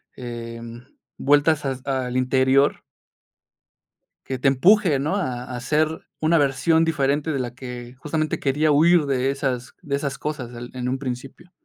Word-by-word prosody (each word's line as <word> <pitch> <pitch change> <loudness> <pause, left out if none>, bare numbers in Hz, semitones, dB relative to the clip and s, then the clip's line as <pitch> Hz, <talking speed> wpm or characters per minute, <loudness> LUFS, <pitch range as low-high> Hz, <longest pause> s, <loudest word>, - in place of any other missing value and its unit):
em, 115 0 -8 0.3
vueltas 145 +1 +3
as 135 -1 -3
al 130 -2 -2
interior. 130 +2 +2 1.4
Que 130 - -3
te 135 - +2
empuje, 170 +3 +4
¿no?, 150 +7 -1
a 130 -11 -2
a - - -4
ser 150 +5 +2 0.3
una 160 +2 +3
versión 145 +3 +3
diferente 150 -1 0
de 140 - -1
la 120 -1 -4
que 125 -1 -8
justamente 155 +3 -2
quería 150 +3 +2
huir 160 +2 +5
de 135 -1 +1
esas 130 -3 -3
de 140 -1 -2
esas 140 -1 -3
cosas 140 -5 -5
el 120 +1 -8
en 125 -1 -3
un 130 +1 -2
principio. 135 +6 -7
135 Hz, 155 wpm, -23 LUFS, 125-150 Hz, 1.4 s, huir